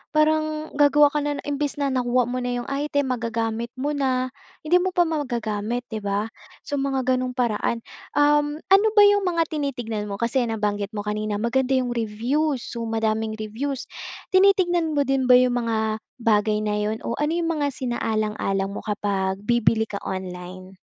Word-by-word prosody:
Parang 310 Hz, 0 st, +1 dB
gagawa 290 Hz, 0 st, +6 dB
ka 300 Hz, -, 0 dB
na 290 Hz, 0 st, -1 dB
imbes 290 Hz, 0 st, -2 dB
na 280 Hz, -2 st, -1 dB
nakuha 250 Hz, -1 st, +2 dB
mo 250 Hz, +2 st, -3 dB
na 245 Hz, -, -3 dB
'yung 245 Hz, -, -2 dB
item, 285 Hz, -1 st, 0 dB
magagamit 230 Hz, -1 st, -2 dB
mo 280 Hz, +3 st, -2 dB
na, 255 Hz, -3 st, 0 dB, 0.3 s
hindi 350 Hz, +4 st, +4 dB
mo 370 Hz, 0 st, -2 dB
pa 350 Hz, -, +5 dB
magagamit, 240 Hz, -7 st, -2 dB
di 220 Hz, -, -3 dB
ba, 205 Hz, +2 st, -2 dB, 0.3 s
so 285 Hz, -2 st, -3 dB
mga 270 Hz, -1 st, 0 dB
gano'ng 255 Hz, 0 st, 0 dB
paraan. 230 Hz, -1 st, 0 dB, 0.3 s
Um, 295 Hz, 0 st, +3 dB, 0.2 s
ano 400 Hz, +3 st, +7 dB
ba 415 Hz, -, +8 dB
'yung 405 Hz, -2 st, +4 dB
mga 335 Hz, -2 st, +2 dB
tinitignan 245 Hz, -8 st, -3 dB
mo, 200 Hz, -, -4 dB
kasi 235 Hz, +5 st, 0 dB
nabanggit 210 Hz, -1 st, -2 dB
mo 205 Hz, -, -3 dB
kanina, 210 Hz, 0 st, -2 dB
maganda 250 Hz, +5 st, +1 dB
'yung 255 Hz, -2 st, 0 dB
reviews, 240 Hz, +5 st, -1 dB
so, 230 Hz, -1 st, -5 dB
madaming 220 Hz, -1 st, -1 dB
reviews, 230 Hz, +6 st, -4 dB, 0.5 s
tinitignan 355 Hz, -4 st, +3 dB
mo 285 Hz, -, +3 dB
din 270 Hz, -1 st, 0 dB
ba 250 Hz, -, +8 dB
'yung 250 Hz, 0 st, +5 dB
mga 220 Hz, -2 st, -1 dB, 0.2 s
bagay 215 Hz, -1 st, +2 dB
na 210 Hz, 0 st, 0 dB
'yun 215 Hz, +1 st, -2 dB
o -, -, -3 dB
ano 300 Hz, +3 st, +1 dB
'yung 335 Hz, -1 st, 0 dB
mga 295 Hz, -3 st, 0 dB
sinaalang-alang 215 Hz, -5 st, -1 dB
mo -, -, -5 dB
kapag 200 Hz, -1 st, -1 dB
bibili 230 Hz, -1 st, +2 dB
ka 205 Hz, -2 st, -5 dB
online? 185 Hz, 0 st, -7 dB
245 Hz, 170 wpm, -24 LUFS, 215-290 Hz, 0.5 s, ba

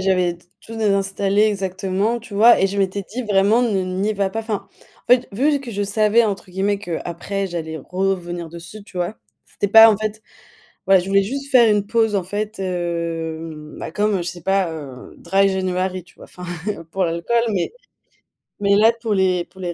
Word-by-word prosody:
j'avais 180 Hz, -2 st, +1 dB, 0.2 s
tout 225 Hz, 0 st, -10 dB
désinstallé 200 Hz, -1 st, +1 dB
exactement, 195 Hz, +2 st, 0 dB
tu 225 Hz, -2 st, -14 dB
vois, 225 Hz, +4 st, +6 dB
et 195 Hz, -, +3 dB
je 200 Hz, +1 st, -4 dB
m'étais 195 Hz, +1 st, 0 dB
dit 240 Hz, +7 st, -6 dB
vraiment, 210 Hz, +2 st, +3 dB
ne 205 Hz, -6 st, +1 dB
n'y 190 Hz, +3 st, -1 dB
va 200 Hz, -2 st, -1 dB
pas. 225 Hz, -, -4 dB
Enfin, 220 Hz, -2 st, -4 dB
en -, -, -27 dB
fait, 250 Hz, 0 st, +4 dB
vu 285 Hz, +7 st, +2 dB
que 240 Hz, -4 st, -8 dB
je 205 Hz, +1 st, -2 dB
savais 215 Hz, +3 st, +3 dB
entre 200 Hz, -3 st, -3 dB
guillemets 200 Hz, +2 st, 0 dB
qu'après 180 Hz, +2 st, -4 dB
j'allais 160 Hz, -2 st, -5 dB
revenir 175 Hz, 0 st, -3 dB
dessus, 170 Hz, +5 st, -10 dB
tu 185 Hz, -, -15 dB
vois, 175 Hz, +5 st, -2 dB, 0.3 s
c'était 205 Hz, -, -3 dB
pas 225 Hz, +2 st, +9 dB
en 210 Hz, -, +1 dB
fait 215 Hz, 0 st, -4 dB, 0.6 s
voilà, 195 Hz, -1 st, +6 dB
je 175 Hz, -, -8 dB
voulais 195 Hz, 0 st, +4 dB
juste 275 Hz, +6 st, -5 dB
faire 240 Hz, -4 st, +6 dB
une 205 Hz, -1 st, +1 dB
pause 225 Hz, -1 st, +1 dB
en 185 Hz, -, -1 dB
fait, 210 Hz, +2 st, -4 dB
hem, 165 Hz, -3 st, -4 dB
bah -, -, -6 dB
comme 205 Hz, +3 st, 0 dB
je -, -, -3 dB
sais 175 Hz, 0 st, -6 dB
pas, 195 Hz, -2 st, +1 dB
heu, 140 Hz, -5 st, -9 dB
dry 195 Hz, 0 st, +2 dB
january, 185 Hz, -1 st, -2 dB
tu 175 Hz, -, -23 dB
vois, -, -, -14 dB
enfin 180 Hz, -, -11 dB, 0.5 s
pour 190 Hz, 0 st, 0 dB
l'alcool, 170 Hz, +8 st, 0 dB
mais 185 Hz, -3 st, -1 dB, 0.9 s
mais 200 Hz, 0 st, +4 dB
là 225 Hz, +2 st, +5 dB
pour 220 Hz, -3 st, -1 dB
les 185 Hz, -2 st, +2 dB
pour 190 Hz, -, -20 dB
les 175 Hz, -2 st, -3 dB
195 Hz, 195 wpm, -20 LUFS, 180-215 Hz, 0.9 s, pas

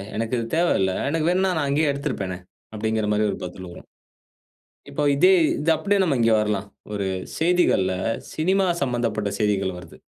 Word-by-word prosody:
எனக்கு 115 Hz, +2 st, -3 dB
இது 115 Hz, -, -3 dB
தேவையில்ல. 95 Hz, -, +2 dB, 0.2 s
எனக்கு 160 Hz, +1 st, 0 dB
வேணும்னா 185 Hz, +1 st, +2 dB
நான் 145 Hz, -2 st, 0 dB
அங்கேயே 145 Hz, +1 st, +2 dB
எடுத்திருப்பேனே" 125 Hz, -, -3 dB, 0.4 s
அப்படிங்கிற 110 Hz, 0 st, -1 dB
மாதிரி 105 Hz, +1 st, +2 dB
ஒரு -, -, -5 dB
பதில் 90 Hz, +1 st, -8 dB
வரும். -, -, -13 dB, 1.0 s
இப்ப 145 Hz, +1 st, -2 dB
இதே 185 Hz, +6 st, +5 dB, 0.3 s
இது 165 Hz, +2 st, +1 dB
அப்படியே 205 Hz, +3 st, +1 dB
நம்ம 155 Hz, -7 st, +1 dB
இங்கே 115 Hz, -1 st, +4 dB
வரலாம். 105 Hz, -1 st, -1 dB, 0.3 s
ஒரு 100 Hz, -2 st, -2 dB, 0.3 s
செய்திகள்ல 165 Hz, -, +2 dB, 0.4 s
சினிமா 190 Hz, +4 st, +1 dB, 0.2 s
சம்பந்தப்பட்ட 120 Hz, -5 st, -1 dB
செய்திகள் 100 Hz, -3 st, 0 dB
வருது. 85 Hz, -2 st, -13 dB
115 Hz, 155 wpm, -23 LUFS, 105-160 Hz, 1.0 s, இதே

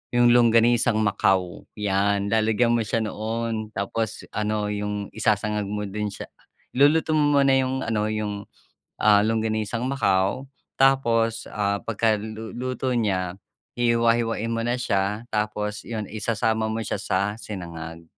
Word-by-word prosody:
yung 120 Hz, 0 st, +5 dB
Longganisang 115 Hz, -1 st, +4 dB
Macao. 95 Hz, -3 st, 0 dB
'Yan 100 Hz, 0 st, 0 dB
lalagyan 110 Hz, +2 st, +2 dB
mo 120 Hz, -, +2 dB
siya 115 Hz, +2 st, 0 dB
noon 110 Hz, +1 st, -3 dB
tapos 110 Hz, +2 st, -3 dB
ano 105 Hz, -1 st, -1 dB
yung 105 Hz, 0 st, -3 dB
isasangag 105 Hz, -1 st, 0 dB
mo 105 Hz, +1 st, -3 dB
din 105 Hz, +1 st, -3 dB
siya. 100 Hz, -, -8 dB, 0.4 s
Iluluto 150 Hz, +4 st, +3 dB
mo 145 Hz, -1 st, +3 dB
muna 135 Hz, -, +3 dB
yung 130 Hz, 0 st, 0 dB
ano, 105 Hz, -1 st, 0 dB
yung, 105 Hz, -2 st, -3 dB, 0.5 s
ah, 105 Hz, -1 st, +5 dB
Longganisang 110 Hz, +2 st, -1 dB
Macao 100 Hz, -1 st, +1 dB, 0.3 s
tapos, 115 Hz, -4 st, +2 dB
ah, 100 Hz, -1 st, -1 dB
pagkaluluto 110 Hz, +4 st, -2 dB
niya 95 Hz, -6 st, 0 dB, 0.5 s
hihiwa-hiwain 115 Hz, -1 st, +1 dB
mo 115 Hz, 0 st, -1 dB
na 120 Hz, -, +1 dB
siya 105 Hz, -2 st, -1 dB
tapos 105 Hz, -1 st, -2 dB
'yon 110 Hz, -2 st, -3 dB
isasama 110 Hz, +1 st, 0 dB
mo 110 Hz, +1 st, -2 dB
siya 100 Hz, -, -3 dB
sa 95 Hz, -2 st, 0 dB, 0.2 s
sinangag, 85 Hz, -5 st, -7 dB
110 Hz, 130 wpm, -24 LUFS, 105-115 Hz, 0.5 s, yung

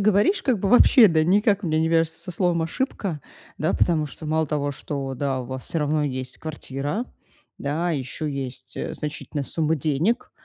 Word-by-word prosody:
говоришь, 210 Hz, -, +3 dB
как 255 Hz, -6 st, +2 dB
бы 195 Hz, -, -1 dB
вообще, 245 Hz, 0 st, +7 dB
да, 160 Hz, -2 st, +3 dB
никак 205 Hz, +3 st, +3 dB
у -, -, -1 dB
меня 155 Hz, -1 st, +2 dB
не 160 Hz, -, +2 dB
вяжется 165 Hz, -1 st, +1 dB
со 180 Hz, -, -6 dB
словом 175 Hz, -2 st, +1 dB
"ошибка". 175 Hz, -, -2 dB, 0.4 s
Да. -, -, +1 dB
Потому 155 Hz, -3 st, +2 dB
что 155 Hz, +2 st, -9 dB
мало 160 Hz, +1 st, +1 dB
того, 145 Hz, -1 st, -1 dB
что, 135 Hz, -1 st, -4 dB
да, 135 Hz, 0 st, -1 dB
у -, -, -5 dB
вас 130 Hz, +1 st, -6 dB
всё 165 Hz, -, -2 dB
равно 150 Hz, 0 st, +1 dB
есть 130 Hz, -2 st, -4 dB
квартира. 150 Hz, -, -4 dB, 0.5 s
Да. 155 Hz, +5 st, -1 dB
Еще 150 Hz, +1 st, -3 dB
есть, 130 Hz, -2 st, -6 dB
э, -, -, -3 dB
значительная 150 Hz, -1 st, -4 dB
сумма 160 Hz, +2 st, 0 dB
денег. 155 Hz, -, 0 dB
155 Hz, 190 wpm, -24 LUFS, 140-175 Hz, 0.5 s, вообще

